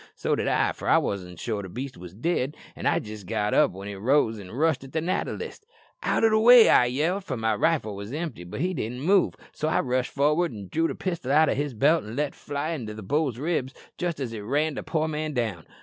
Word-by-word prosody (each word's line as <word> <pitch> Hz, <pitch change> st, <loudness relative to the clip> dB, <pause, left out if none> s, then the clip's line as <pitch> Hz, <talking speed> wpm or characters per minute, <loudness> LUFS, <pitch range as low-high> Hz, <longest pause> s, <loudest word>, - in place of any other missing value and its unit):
So -, -, -1 dB
did -, -, -2 dB
I, -, -, +2 dB
for -, -, -5 dB
I -, -, +6 dB
wasn't 90 Hz, -3 st, -3 dB
sure 110 Hz, -4 st, -2 dB
the 95 Hz, -, -8 dB
beast 130 Hz, +7 st, -6 dB
was 90 Hz, 0 st, -11 dB
dead, 145 Hz, -, -1 dB, 0.2 s
an' -, -, -3 dB
I -, -, +4 dB
had -, -, -1 dB
jist 105 Hz, -3 st, -9 dB
got 105 Hz, +3 st, 0 dB
up -, -, +5 dB
when 95 Hz, +2 st, -9 dB
it 100 Hz, -1 st, -6 dB
rose 115 Hz, 0 st, +2 dB
an' 95 Hz, -3 st, -10 dB
rushed 145 Hz, +1 st, +1 dB
at 135 Hz, -, -12 dB
the 160 Hz, -, +1 dB
natter 170 Hz, +4 st, -1 dB
list. 425 Hz, -, -8 dB, 0.3 s
"'Out -, -, +1 dB
o' 225 Hz, -, +6 dB
the 215 Hz, -, +4 dB
way,' 240 Hz, +1 st, +8 dB
I 125 Hz, -, +6 dB
yelled, 160 Hz, +11 st, 0 dB
for 130 Hz, -9 st, -4 dB
my 110 Hz, 0 st, +1 dB
rifle 110 Hz, -3 st, +1 dB
was 100 Hz, +2 st, -7 dB
empty; 155 Hz, -, -4 dB
but 90 Hz, +10 st, -6 dB
he 185 Hz, +2 st, 0 dB
didn't 125 Hz, -4 st, -4 dB
move, 190 Hz, +5 st, +3 dB, 0.2 s
so 155 Hz, -, -3 dB
I 160 Hz, -, +2 dB
rushed 130 Hz, 0 st, -1 dB
for'ard 150 Hz, +2 st, +2 dB
an' 100 Hz, -4 st, -8 dB
drew 165 Hz, +1 st, +2 dB
the -, -, -4 dB
pistol 170 Hz, -8 st, -3 dB
out 155 Hz, +1 st, +5 dB
o' -, -, +2 dB
his 145 Hz, -2 st, -2 dB
belt 150 Hz, +9 st, +3 dB
and 110 Hz, +2 st, -8 dB
let 145 Hz, +1 st, -1 dB
fly 145 Hz, +3 st, -4 dB
in 145 Hz, -8 st, -4 dB
the 105 Hz, 0 st, -7 dB
bull's 140 Hz, +1 st, 0 dB
ribs 140 Hz, -2 st, -2 dB, 0.2 s
jist 175 Hz, -4 st, -2 dB
as 125 Hz, -4 st, -3 dB
it 110 Hz, -, -5 dB
ran 145 Hz, +9 st, 0 dB
the -, -, -4 dB
poor 160 Hz, -1 st, -1 dB
man 155 Hz, 0 st, -3 dB
down. 110 Hz, -, -2 dB
135 Hz, 260 wpm, -26 LUFS, 110-160 Hz, 0.3 s, way